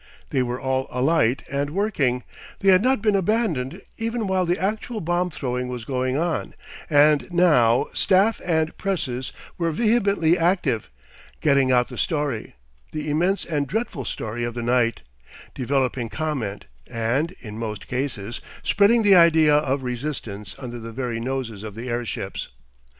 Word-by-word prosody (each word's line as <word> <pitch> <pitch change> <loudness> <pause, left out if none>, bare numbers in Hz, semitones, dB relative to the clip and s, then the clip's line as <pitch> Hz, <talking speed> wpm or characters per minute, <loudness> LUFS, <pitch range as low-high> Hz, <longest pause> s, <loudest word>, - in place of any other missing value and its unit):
They 130 - +2
were 125 0 -2
all 130 0 -1
alight 130 -1 +2
and 140 +1 -1
working; 150 - 0 0.4
they 195 - +4
had 185 0 +6
not 255 -2 +2
been 210 -2 +3
abandoned 190 - 0 0.2
even 230 0 -1
while 190 -2 +1
the 175 +2 +1
actual 215 +4 -2
bomb 175 0 0
throwing 125 -4 -3
was 125 -3 -5
going 130 +1 -1
on, 165 0 -2 0.3
and 150 +2 +4
now 145 -8 +4
staff 200 +4 +3
and 160 -2 0
presses 130 -10 -2 0.3
were 165 -1 +1
vehemently 200 -4 +2
active, 165 - +1 0.5
getting 140 -3 +3
out 125 -1 +3
the - - -7
story, 145 -8 -2 0.4
the 150 -1 -3
immense 180 +6 +1
and 145 -4 -1
dreadful 175 - -2
story 110 +2 -4
of 120 0 -3
the 120 - -3
night, 120 -1 +1 0.5
developing 130 -2 -1
comment 135 -10 -3 0.2
and, 125 +10 -1
in 110 -1 -8
most 110 -2 -5
cases, 120 -4 -3 0.2
spreading 220 +3 +4
the 205 -1 +6
idea 160 -4 +6
of 140 -2 +1
resistance 120 -6 -5
under 120 -2 -7
the 115 0 -7
very 120 -1 -3
noses 120 -4 -3
of 105 -2 -7
the 120 +3 -6
airships. 120 -1 -3
140 Hz, 150 wpm, -23 LUFS, 125-175 Hz, 0.5 s, had